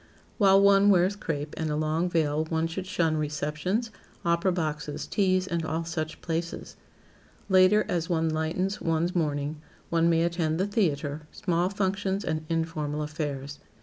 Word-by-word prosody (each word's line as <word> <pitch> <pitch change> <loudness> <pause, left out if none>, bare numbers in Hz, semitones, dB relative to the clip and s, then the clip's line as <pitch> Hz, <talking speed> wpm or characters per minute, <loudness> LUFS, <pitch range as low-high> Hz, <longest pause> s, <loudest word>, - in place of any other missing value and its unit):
While 195 -2 +6
one 200 0 +6
wears 190 +1 +4
crape 150 -7 -4
and 160 -1 -2
a 150 - -1
long 155 +3 0
veil 155 -2 +1
one 160 0 0
should 180 +3 -4
shun 165 -4 +1
receptions, 150 +9 -2 0.3
opera 170 +2 +2
boxes, 150 -4 -3
teas 185 -2 +1
and 170 -3 -2
all 160 +1 -2
such 155 -1 -4
places. 170 0 -4 0.7
Later, 190 +3 +5
as 170 -2 -1
one 165 -2 +1
lightens 160 +5 -1
one's 165 +2 0
mourning, 150 -2 -1 0.3
one 165 0 +3
may 165 0 +3
attend 170 -2 0
the 190 - +2
theater, 155 -7 -1
small 175 0 0
functions 195 0 -1
and 155 0 -2
informal 155 -2 -2
affairs. 145 -2 -4
165 Hz, 150 wpm, -27 LUFS, 155-185 Hz, 0.7 s, While